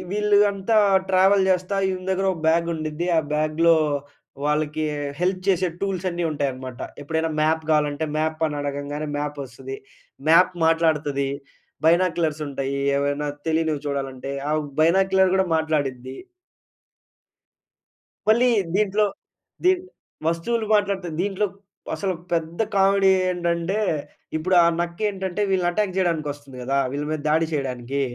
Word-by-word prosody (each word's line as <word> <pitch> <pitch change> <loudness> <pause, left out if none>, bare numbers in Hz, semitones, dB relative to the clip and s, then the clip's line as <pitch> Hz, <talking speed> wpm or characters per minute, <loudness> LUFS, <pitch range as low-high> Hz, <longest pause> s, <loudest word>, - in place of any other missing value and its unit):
వీళ్ళూ 210 0 +3
అంతా 200 +3 0 0.3
ట్రావెల్ 190 +1 +4
చేస్తా 185 +2 0
ఈయన 185 -1 -3
దగ్గర 190 +1 0
ఒక 170 - -7
బ్యాగ్ 165 +1 +3
ఉండిద్ది. 155 +1 -3
ఆ - - +5
బ్యాగ్‌లో 155 +2 +3 0.7
వాళ్ళకీ 150 +1 0 0.4
హెల్ప్ 185 +1 +1
చేసే 185 -1 +3
టూల్స్ 195 -2 -2
అన్నీ 170 0 -2
ఉంటాయనమాట. 130 -4 -4 0.2
ఎప్పుడైనా 160 +2 -1
మ్యాప్ 160 +1 +2
కావాలంటే 150 0 +1
మ్యాప్ 155 0 -1
అని 150 -1 -4
అడగంగానే 145 +1 -4
మ్యాప్ 145 0 -3
వస్తది. 135 +1 -8 0.5
మ్యాప్ 175 +3 +6
మాట్లాడతది. 150 -4 +1 0.6
బైనాక్యులర్స్ 165 -3 +2
ఉంటాయి. 135 0 -3 0.2
ఏమైనా 145 +1 -1 0.2
తెలీనివి 160 -2 0
చూడాలంటే. 135 -1 -4 0.2
ఆ - - +1 0.3
బైనాక్యులర్ 190 +3 +4
కూడా 190 0 +2
మాట్లాడిద్ది. 140 -5 -2 2.1
మళ్ళీ 235 +3 +5 0.3
దీంట్లో 210 0 +2 0.6
దీన్ 365 0 +4 0.4
వస్తువులు 215 +8 0
మాట్లాడితే 200 -3 +1
దీంట్లో 200 +2 0 0.5
అసలు 195 -2 -1 0.2
పెద్ద 165 +2 -2
కామెడీ 195 0 +4 0.2
ఏంటంటే, 170 +2 -1 0.6
ఇప్పుడు 185 +4 0
ఆ - - +5
నక్క 170 0 -3
ఏంటంటే 190 0 -3
వీళ్ళని 185 -2 +2
అటాక్ 190 +1 -1
చేయడానికి 170 -5 0
వస్తుంది 140 -2 -14
గదా! 135 +2 0
వీళ్ళ 145 +1 -2
మీద 155 - -2
దాడి 160 +1 +3
చేయడానికీ. 135 -2 -2
165 Hz, 125 wpm, -23 LUFS, 150-190 Hz, 2.1 s, మ్యాప్